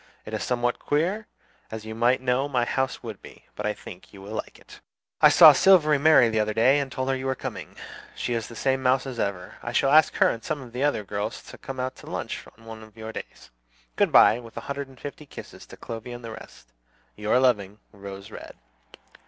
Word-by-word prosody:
It - - -9
is - - -2
somewhat 120 0 -1
queer, 185 +9 -1 0.4
as 110 -1 -7
you 110 - -6
might 120 +3 +2
know 130 +2 0
my 125 -3 +1
house 130 +2 -2
would 110 -4 -8
be; - - -15
but 105 - -3
I 105 - -1
think 90 - -12
you 100 - -13
will 105 +2 -8
like - - -6
it. - - -16 0.4
"I - - +9
saw - - +9
Silvery 155 -6 +5
Mary 155 -4 +6
the 110 -1 0
other 105 0 -1
day 130 +6 +4
and 140 -2 -3
told 130 -1 -3
her 135 - +1
you 130 0 -4
were 130 - 0
coming. - - -7 0.4
She 120 - -3
is 115 -2 -2
the 115 - -11
same 130 +2 0
mouse 130 +1 +2
as 130 -3 -6
ever. 95 -3 -3
I 120 - -6
shall 135 - +2
ask 155 +1 +5
her - - +4
and 115 - -3
some 155 -2 -3
of 125 -3 -11
the 125 +3 -2
other 145 -7 +1
girls 105 +4 -4
to - - -12
come 135 -1 -7
out 130 +1 -3
to - - -14
lunch - - -5
on 115 - -19
one 110 -1 -9
of 110 0 -16
your 110 0 -7
days. - - -10 0.4
Good - - +2
by, 115 - +6
with 115 -2 -13
a - - -4
hundred 140 0 -5
and 130 -1 -18
fifty 145 +1 -9
kisses - - -11
to - - -13
Clovy 115 +1 -7
and 120 -1 -10
the 115 - -7
rest. 110 - -13 0.4
"Your 105 +4 +1
loving 105 -6 +1
"ROSE 100 +1 -10
RED." - - -10
120 Hz, 235 wpm, -25 LUFS, 110-135 Hz, 0.4 s, I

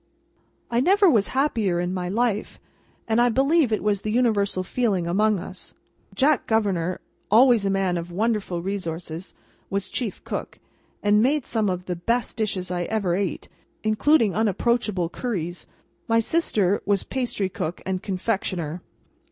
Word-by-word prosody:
I 235 - +2
never 390 +8 +4
was 225 - +4
happier 230 -10 +1
in 175 +1 -1
my 180 -1 -3
life, 220 0 -1 0.5
and 225 +1 +3
I 245 - +4
believe 275 +2 +3
it 215 - 0
was 205 -2 +1
the 215 - -3
universal 210 -5 +1
feeling 200 -4 0
among 205 +4 +2
us. 185 +1 -8 0.4
Jack 285 +3 +2
Governor, 190 -6 0 0.3
always 230 -2 +5
a - - +1
man 190 -2 +1
of 170 +1 -7
wonderful 200 -3 -1
resources, 175 -3 -5 0.3
was 195 0 -1
Chief 230 -6 -4
Cook, - - -5 0.5
and 210 0 +4
made 275 +3 +2
some 220 -3 0
of 180 -1 -3
the 180 - -3
best 230 +8 -1
dishes 195 -5 -2
I 175 -1 -1
ever 200 -4 0
ate, 195 -2 -2 0.4
including 215 +1 +3
unapproachable 215 -3 0
curries. 175 -8 -4 0.4
My 230 0 +3
sister 215 - +1
was 200 -1 +1
pastrycook 200 -9 -3
and 190 -1 -2
confectioner. 185 -4 -2
205 Hz, 145 wpm, -24 LUFS, 185-235 Hz, 0.5 s, always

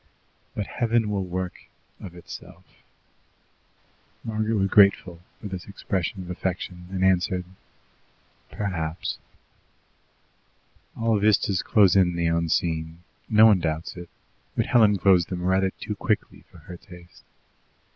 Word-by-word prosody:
But 105 - -2
Heaven 115 -2 0
will 100 -2 -2
work 90 -1 -5 0.3
of 90 -3 -10
itself." 85 - -11 1.6
Margaret 110 0 -1
was 95 -2 +1
grateful 95 -4 +4 0.2
for - - -13
this 95 -3 -6
expression 95 -1 -3
of 90 - -7
affection, 90 -1 -4
and 95 0 0
answered, 90 -1 +1 1.0
"Perhaps." 85 -5 -4 1.8
All 115 -2 +1
vistas 100 -2 +2
close 100 -4 +4
in 90 -3 +3
the 85 0 -1
unseen 85 0 -1 0.3
no 110 0 +7
one 105 -4 +6
doubts 80 -1 -3
it 90 -1 -9 0.5
but - - +2
Helen 105 -4 +4
closed 90 -3 +3
them 90 -1 -4
rather 95 +1 +2
too 105 - -6
quickly 105 +1 -2
for - - -17
her 90 - -11
taste. 90 -1 -16
95 Hz, 125 wpm, -25 LUFS, 85-100 Hz, 1.8 s, no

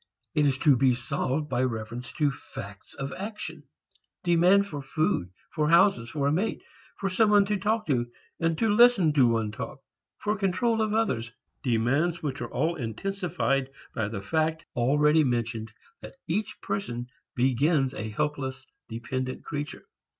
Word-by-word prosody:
It 150 -1 +3
is 135 -2 +1
to 145 -1 +5
be 125 0 +3
solved 135 +3 -2
by 125 - 0
reference 115 0 -3
to 150 -3 +2
facts 100 -6 -10
of 135 0 -4
action, 210 +2 -6 0.6
demand 180 +3 +5
for 145 -7 -6
food, 135 - 0 0.2
for 150 -2 0
houses, 170 - +4
for 145 0 -2
a 140 - +3
mate, 185 +8 -1 0.3
for 195 - -2
some 210 +3 +3
one 205 -1 +6
to 210 +1 0
talk 215 +3 0
to 125 -5 +1 0.3
and 165 -1 +1
to 225 - +2
listen 220 -8 +6
to 135 -4 +5
one 115 -2 +1
talk, 105 - -6 0.4
for 210 0 -1
control 215 +4 +1
of 215 -1 0
others, 120 - 0 0.3
demands 140 +8 +1
which 140 -3 -3
are - - -4
all 160 +6 +1
intensified 135 - -1 0.2
by 110 -3 -1
the 105 -2 -5
fact 160 +8 0
already 150 +5 +4
mentioned 115 -4 -1 0.3
that - - -10
each 200 +6 -2
person 120 -12 -3 0.3
begins 135 +2 +2
a 110 0 -4
helpless, 130 +1 -3 0.2
dependent 130 +3 -4
creature. 145 -1 -5
145 Hz, 155 wpm, -27 LUFS, 120-175 Hz, 0.6 s, one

